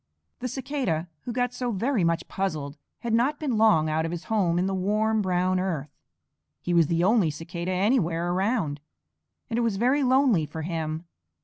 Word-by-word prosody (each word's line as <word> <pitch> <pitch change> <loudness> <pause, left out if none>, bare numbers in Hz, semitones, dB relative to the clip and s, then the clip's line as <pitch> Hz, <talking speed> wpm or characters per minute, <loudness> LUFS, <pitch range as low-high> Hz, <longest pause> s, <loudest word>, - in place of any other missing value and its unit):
The 250 - -3
Cicada 250 - -2 0.2
who 245 - -3
got 245 +1 -1
so 245 -1 -2
very 230 +1 0
much 165 0 0
puzzled 155 -7 -3 0.3
had 235 -1 -2
not 260 +6 +2
been 280 -6 -1
long 165 -8 +5
out 155 +1 0
of 165 - -2
his 175 0 -5
home 190 -7 +1
in 180 - +1
the 195 - -1
warm, 215 +3 +1
brown 185 -1 +1
earth. 160 -7 -2 0.7
He 175 - -2
was 170 -3 +5
the 170 +1 +1
only 200 -3 +4
Cicada 170 +4 -5
anywhere 180 -4 +1
around, 185 -6 0 0.7
and 235 -1 -1
it - - +2
was 230 -4 0
very 255 +7 +2
lonely 255 - +3
for 160 +1 -6
him. 160 0 -3
185 Hz, 185 wpm, -26 LUFS, 165-235 Hz, 0.7 s, long